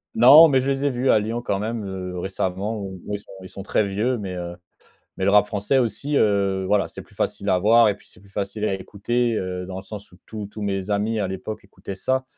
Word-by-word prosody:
Non, 140 +8 +9
mais 135 -4 +3
je 135 - -1
les 135 +1 0
ai 140 - +2
vus 125 +1 0
à - - +6
Lyon 110 +3 -2
quand 100 -5 -1
même, 110 +1 -3
heu, 90 -2 -5
récemment, 95 +3 -2
où 95 -2 -7
ils - - -2
sont - - -15
ils 95 - -10
sont 100 - -8
très 105 +1 +1
vieux. 110 +6 -1
Mais, 95 -3 -5
heu, 85 -1 -5 0.6
mais 95 - -2
le 100 - +4
rap 105 0 +5
français 105 +6 0
aussi, 130 +5 -1
heu, 100 -4 +2
voilà, 100 0 +2
c'est - - -10
plus - - -22
facile 100 - -2
à 90 - +3
voir 115 +3 +6
et 105 - +1
puis - - -22
c'est - - -19
plus 100 0 -20
facile 100 +2 -3
à 100 - +1
écouter, 115 +5 -1
heu, 90 -1 -3
dans 95 0 -7
le 95 - -6
sens 105 0 -10
où 90 - -18
tous 105 -2 -6
tous 105 - -9
mes 100 0 -2
amis, 105 +2 0
à 100 - -1
l'époque, 95 +3 -6
écoutaient 100 - -9
ça 130 +7 -1
105 Hz, 255 wpm, -23 LUFS, 95-115 Hz, 0.6 s, Non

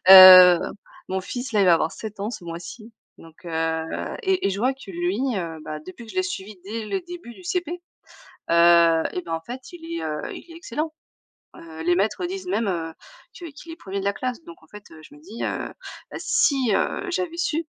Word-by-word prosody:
heu, 185 -2 +11 0.5
mon 190 0 -1
fils, 245 +6 -6
là, 210 - +3
il 195 - +4
va 175 - +7
avoir 160 0 0
7 215 -2 -8
ans 205 +3 -3
ce 210 - -8
mois-ci, 175 +7 -8 0.3
donc 165 +1 -17
heu 160 -1 -1 0.4
et 380 -3 +1
et - - +1
je 195 - -3
vois 255 +5 +2
que 265 -7 -12
lui, 175 +5 -2 0.2
heu, 165 -3 -4
bah, 155 0 -6
depuis 225 +5 -10
que - - -11
je - - -12
l'ai 370 - +3
suivi 215 - -6
dès 215 +2 -5
le 380 - -2
début 345 -9 -10
du 370 - -15
CP, 350 -2 -3 0.7
heu 170 -1 +6
et 180 - -2
bah, 165 - -5
en 165 - -2
fait, 250 - -9
il 340 - -11 0.2
est, - - -5
heu, 150 -1 -3
il 345 - -10
est - - -12
excellent, 315 -2 -4 0.6
heu, 160 -1 -10
les 175 +1 +2
maîtres 220 - 0
disent 375 0 -6
même, 230 - 0
heu, 165 -3 -3 0.5
que 345 - -8
qu'il 295 +3 -11
est 325 - -9
1er 195 +1 -6
de 195 - -4
la 200 - +1
classe 250 -2 -4
donc 170 -1 -13
en 160 - -21
fait, 210 0 -12
heu, 160 - -13
je 290 - -15
me 295 - -17
dis, 350 - -9
heu: - - 0 0.6
«Bah - - -6
si, 285 - +2
heu, 395 -2 -1
j'avais 340 -1 -3
su, 330 -2 -1
210 Hz, 230 wpm, -23 LUFS, -, 0.7 s, heu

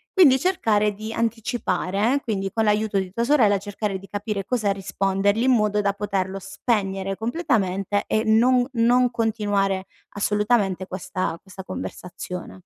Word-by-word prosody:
Quindi 275 -9 +6
cercare 210 - +1
di 215 +2 -7
anticipare 225 -2 -1
eh, 280 - 0
quindi 195 -3 -2
con 225 - +1
l'aiuto 210 -1 +1
di 190 -1 -2
tua 235 +4 -1
sorella 230 -8 +4
cercare 205 0 -4
di 195 - -13
capire 205 -1 -4
cosa 215 -5 0
rispondergli 195 +2 0
in 260 - +4
modo 210 -3 +2
da 200 -1 +1
poterlo 195 -1 -2
spegnere 195 -1 -2
completamente 205 - 0
e 220 +1 +1
non 245 +3 +4
non 245 +1 +3
continuare 205 -4 0 0.3
assolutamente 205 -2 +1
questa 185 -2 -3
questa 190 0 -11
conversazione. 180 -1 -7
205 Hz, 140 wpm, -23 LUFS, 195-230 Hz, 0.3 s, Quindi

